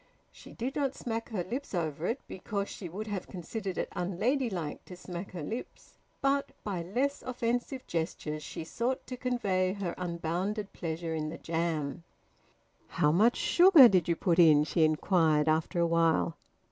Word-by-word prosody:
She - - -14
did 255 +4 -3
not 275 -2 0
smack 230 -1 -4
her 205 -6 -2
lips 245 +4 -5
over 160 -1 -2
it, 240 +4 -1
because 200 +1 -4
she 180 - -7
would 205 +6 -5
have 205 -4 -4
considered 190 +2 -5
it - - -1
unladylike 190 - -1
to 180 - -10
smack 180 +1 -7
her 170 -4 -5
lips, 225 +11 -7 0.2
but 275 0 +2
by 190 -5 -3
less 250 +11 -1
offensive 245 +1 -2
gestures 155 -2 -3
she 150 - -6
sought 240 +10 -2
to 255 - -6
convey 200 -8 0
her 195 -4 -3
unbounded 180 +4 -2
pleasure 165 -1 -4
in 155 -1 -2
the 160 - -6
jam. 165 -3 -2 0.8
"How 150 -3 +2
much 215 +9 +4
sugar 345 -7 +8
did 185 -6 +2
you 170 - +2
put 170 0 +1
in?" 155 -3 +7
she 160 +2 +1
inquired 155 -1 +3
after 160 +3 +1
a 170 - +4
while. 165 - +2
180 Hz, 165 wpm, -30 LUFS, 165-230 Hz, 0.8 s, sugar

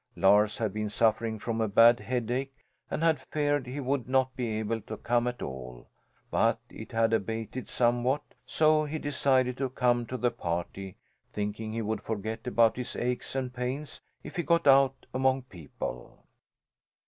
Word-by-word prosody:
Lars 105 +2 +4
had 110 -4 -1
been 105 0 -2
suffering 110 +1 +1
from 115 +1 -2
a 110 - +2
bad 115 +4 +6
headache 125 +2 -2 0.3
and 160 - -2
had 160 -5 +3
feared 145 -3 +1
he 130 +3 -5
would 135 -2 -1
not 130 0 +2
be 115 -4 -2
able 110 +1 -2
to 110 +1 -7
come 120 +2 +1
at 125 0 -3
all; 65 -2 -7 0.4
but - - +2
it - - -9
had 115 0 +2
abated 115 +3 -2
somewhat 120 +3 +1 0.2
so 155 0 +3
he 155 +1 -3
decided 130 -3 +1
to 135 -1 0
come 120 -2 +1
to 130 - -4
the 120 -1 +1
party, 90 -1 -4 0.3
thinking 105 +1 -3
he 115 +1 -2
would 110 +1 -2
forget 110 +2 -4
about 115 -2 +3
his 125 - -4
aches 125 +2 -2
and 130 -2 -2
pains 130 +4 -4 0.2
if - - -9
he - - +2
got 170 +1 +2
out 135 -1 +5
among 130 0 +2
people. 80 - -8
120 Hz, 170 wpm, -29 LUFS, 110-130 Hz, 0.4 s, bad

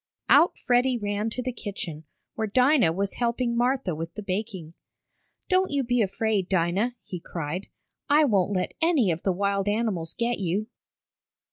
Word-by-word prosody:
Out 345 - +6
Freddie 245 +1 +2
ran 205 0 -2
to 250 +3 -4
the 255 - -2
kitchen, 170 -8 -6 0.3
where 220 -1 -2
Dinah 250 - +4
was 195 +3 -2
helping 235 0 0
Martha 245 -5 +1
with 165 +2 -5
the 210 - -6
baking. 185 -4 -4 0.7
"Don't 375 0 +2
you 280 -1 0
be 245 0 +1
afraid, 205 -1 0
Dinah!" 190 +7 +1
he 185 -4 -6
cried. 170 +2 -5 0.4
"I 300 +2 +5
won't 200 -7 +2
let 185 - -1
any 310 - +3
of 165 +1 -3
the 195 - +1
wild 200 +1 0
animals 205 -6 -1
get 240 -1 0
you!" 195 +3 -1
210 Hz, 160 wpm, -26 LUFS, 185-245 Hz, 0.7 s, Out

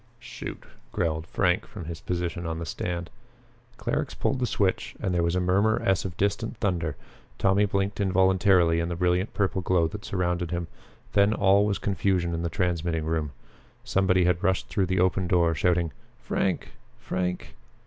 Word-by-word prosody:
"Shoot!" - - -8 0.3
growled 80 +1 -1
Frank 90 -1 +1
from 90 -6 -8
his 80 +1 -6
position 85 -1 -3
on 80 0 -3
the 85 - -4
stand. 85 +1 -4 0.7
Clarux - - -2
pulled 135 - 0
the 125 - +1
switch 100 -3 0
and 90 - -1
there 85 - +2
was 85 +1 +1
a - - +2
murmur 100 +5 +2
as 95 -1 +2
of 90 -3 -5
distant 100 +3 -1
thunder. 85 -8 -1 0.4
Tommy 100 +1 +3
blinked 100 0 -1
involuntarily 95 -3 +4
in 85 +1 -1
the 85 - -2
brilliant 90 +2 +1
purple 95 -2 0
glow 90 -2 +2
that 105 +3 -8
surrounded 90 -2 -1
him. 85 0 -2 0.5
Then 100 +1 +4
all 100 +1 +4
was 100 - 0
confusion 95 -3 0
in 85 - -2
the 85 - -1
transmitting 85 -2 -1
room. 80 -2 -1 0.5
Somebody 95 -1 +2
had 90 0 +2
rushed 95 -1 +1
through 95 -4 0
the 95 0 0
open 95 0 +2
door 85 -2 +3
shouting, 85 +1 +1 0.3
"Frank! - - -1 0.3
Frank!" 90 -1 -3
90 Hz, 170 wpm, -26 LUFS, 85-95 Hz, 0.7 s, involuntarily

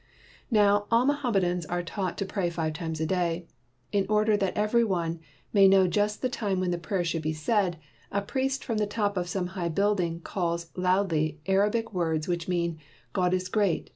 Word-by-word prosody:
Now 205 -3 +4
all 230 +2 +4
Mohammedans 205 -12 +1
are 175 0 -2
taught 185 +1 -3
to 195 - -1
pray 190 -2 -1
five 160 -2 -2
times 160 -1 -4
a 160 - 0
day. 175 0 0 0.5
In 200 -1 +1
order 215 0 +3
that 195 -2 -1
every 215 +3 +3
one 170 -6 -1 0.3
may 195 -1 +7
know 190 -1 +6
just 210 +5 0
the - - +3
time 205 -6 -1
when 185 -1 0
the 175 - -1
prayers 175 +1 -1
should 165 -1 -2
he 155 +1 -1
said, 175 +3 0 0.3
a 200 0 0
priest 270 +5 -1
from 225 -4 -1
the 210 - +1
top 205 -1 -1
of 175 -1 -2
some 180 -1 -2
high 175 -3 -2
building 180 -2 +1
calls 170 -2 -2
loudly 180 -5 +1
Arabic 210 +4 +1
words, 160 -4 0
which 175 -2 -2
mean 170 -3 -1 0.3
"God 180 -2 +2
is 185 0 0
great. 200 -2 0
185 Hz, 195 wpm, -27 LUFS, 170-205 Hz, 0.5 s, may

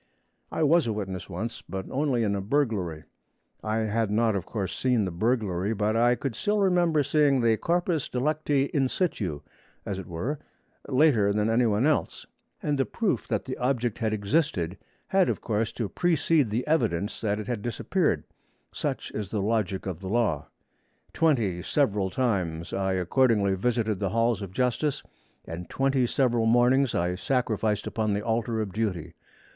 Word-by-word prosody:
I - - 0
was 160 -1 +4
a 110 - 0
witness 95 -3 -5
once, 110 +6 -5
but 95 -1 -6
only 135 -4 +1
in 100 -2 +1
a 100 - -1
burglary. 100 - -1 0.6
I 110 0 -1
had 110 0 0
not, 110 0 +2
of 95 -4 -3
course, 100 -5 -3
seen 125 -5 +1
the 95 - -3
burglary, 105 0 0
but 105 +1 0
I 120 +2 +4
could 125 0 -4
remember 180 -7 +3
seeing 145 -1 +3
the 115 -2 +3
corpus 170 - 0
delicti 145 +1 0
in 135 -3 +2
situ, 100 - -2 0.4
as 95 - -3
it 95 - -8
were, 115 - -3 0.5
later 130 -7 +4
than 105 +2 +1
any 120 +1 +3
one 110 +4 +2
else; 155 -1 0 0.4
and 145 -2 0
the 135 - +3
proof 225 -4 -1
that - - -1
the 130 - -4
object 125 -3 0
had 110 -2 0
existed 100 - 0 0.3
had, 190 -1 +3
of - - -1
course, 110 0 -1
to 115 - -2
precede 160 - +2
the 115 +4 -1
evidence 105 - 0
that 105 -2 0
it 105 - -5
had 115 -2 -3
disappeared. 120 +1 0 0.5
Such - - -3
is 105 -3 -4
the 105 - -2
logic 100 -2 -1
of 90 -4 -4
the 95 -1 -6
law. 110 -9 0 0.7
Twenty 115 - +1
several 100 -4 +1
times 90 -9 -1
I 95 0 0
accordingly 100 +2 +2
visited 110 0 0
the 100 - 0
Halls 115 +2 +1
of 100 -2 -6
Justice, 125 +6 0 0.4
and 85 +1 -7
twenty 135 -2 +1
several 120 -3 +1
mornings 125 +3 +4
I 90 +1 +1
sacrificed 110 -1 0
upon 110 -2 -1
the 105 +1 -2
altar 115 0 0
of 100 -4 -4
duty. 100 -7 -2
115 Hz, 170 wpm, -27 LUFS, 100-135 Hz, 0.7 s, was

